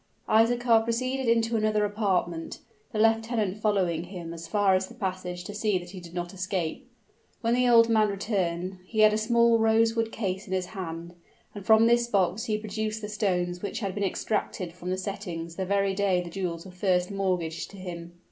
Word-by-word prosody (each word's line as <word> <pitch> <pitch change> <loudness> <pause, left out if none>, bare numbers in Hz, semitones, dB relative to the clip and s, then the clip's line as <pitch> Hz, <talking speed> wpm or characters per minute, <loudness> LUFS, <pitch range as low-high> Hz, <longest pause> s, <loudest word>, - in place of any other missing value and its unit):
Isaachar 230 +1 +4
proceeded 255 +2 -1
into 230 0 +2
another 215 -1 +2
apartment, 190 -5 -1 0.3
the 220 - -4
lieutenant 225 -2 +1
following 185 -6 +1
him 175 -2 -7
as 165 0 -8
far 205 0 +3
as 185 0 +1
the - - -13
passage 185 -2 -4
to 205 - -7
see 210 -2 +1
that 175 0 -8
he 190 - -8
did 175 0 -12
not 175 0 -4
escape. 190 +5 -3 0.5
When 230 0 +1
the 250 0 +3
old 230 -1 +7
man 215 -2 +3
returned, 185 -3 -2
he 220 +1 0
had 215 0 +7
a - - +2
small 235 +1 +4
rosewood 225 0 +2
case 195 -3 -3
in 190 - -4
his 185 -1 0
hand: 170 -3 -6 0.4
and 205 - -8
from 220 +1 +6
this 235 0 +3
box 195 -1 +1
he 215 -1 0
produced 215 0 -3
the 210 - -4
stones 180 -4 -1
which 205 - -4
had 195 -3 -2
been 205 +1 -2
extracted 190 -3 -2
from 180 +1 -7
the 185 - 0
settings 180 -4 -5
the 190 0 -3
very 195 0 +1
day 190 -2 +2
the 175 -1 -5
jewels 170 -2 -4
were 190 - -10
first 180 0 0
mortgaged 180 -4 -2
to 200 - -12
him. 175 -2 -7
200 Hz, 195 wpm, -27 LUFS, 180-220 Hz, 0.5 s, old